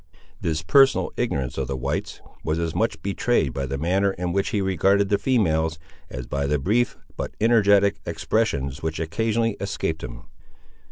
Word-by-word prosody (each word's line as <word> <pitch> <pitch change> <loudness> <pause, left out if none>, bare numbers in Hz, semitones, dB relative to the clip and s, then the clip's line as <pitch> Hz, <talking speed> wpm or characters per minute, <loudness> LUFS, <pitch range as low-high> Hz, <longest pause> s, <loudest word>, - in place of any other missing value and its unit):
This 80 0 -1
personal 135 - +4
ignorance 70 - -2
of - - -2
the 70 - -3
whites 70 +3 -3 0.2
was 80 +1 -1
as 85 -1 -2
much 80 - 0
betrayed 100 - +1
by 70 -1 -3
the 70 +1 -3
manner 95 +6 +1
in 90 -1 -3
which 100 0 0
he 105 - 0
regarded 95 +1 +2
the 100 - +2
females, 80 -11 +1 0.3
as 60 0 -6
by 70 0 -2
the 75 +1 +2
brief, 110 - +1 0.2
but - - -5
energetic, 100 -3 +4
expressions 80 - -1
which 80 0 -3
occasionally 110 +6 0
escaped 95 -5 -3
him. - - -7
85 Hz, 165 wpm, -24 LUFS, 75-100 Hz, 0.3 s, personal